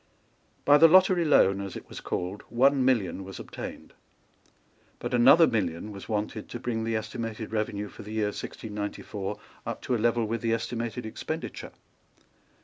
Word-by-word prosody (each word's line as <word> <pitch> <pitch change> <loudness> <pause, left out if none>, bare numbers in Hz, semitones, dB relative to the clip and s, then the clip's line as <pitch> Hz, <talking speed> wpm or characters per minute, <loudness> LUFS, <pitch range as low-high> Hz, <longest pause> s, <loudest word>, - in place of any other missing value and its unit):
By 145 +1 +7
the 165 - +9
lottery 185 +1 +5
loan, 100 -10 +4
as 100 -2 -6
it - - -8
was - - -9
called, 90 +3 -3
one 135 +3 +4
million 105 -8 +1
was 95 0 -9
obtained. - - -8 1.0
But - - -5
another 130 +7 +7
million 100 - -1
was 100 +1 -10
wanted 110 0 -3
to 120 - -6
bring 115 -2 -2
the 115 0 -1
estimated 110 0 -4
revenue 105 -1 -2
for - - -12
the 105 +1 -8
year 110 -2 +1
1694 105 -1 -5 0.3
up - - -4
to 125 - 0
a 110 - -1
level 115 0 +2
with 115 +1 -2
the 115 -1 +1
estimated 115 +1 -4
expenditure. 110 - -5
110 Hz, 160 wpm, -28 LUFS, 105-120 Hz, 1.0 s, the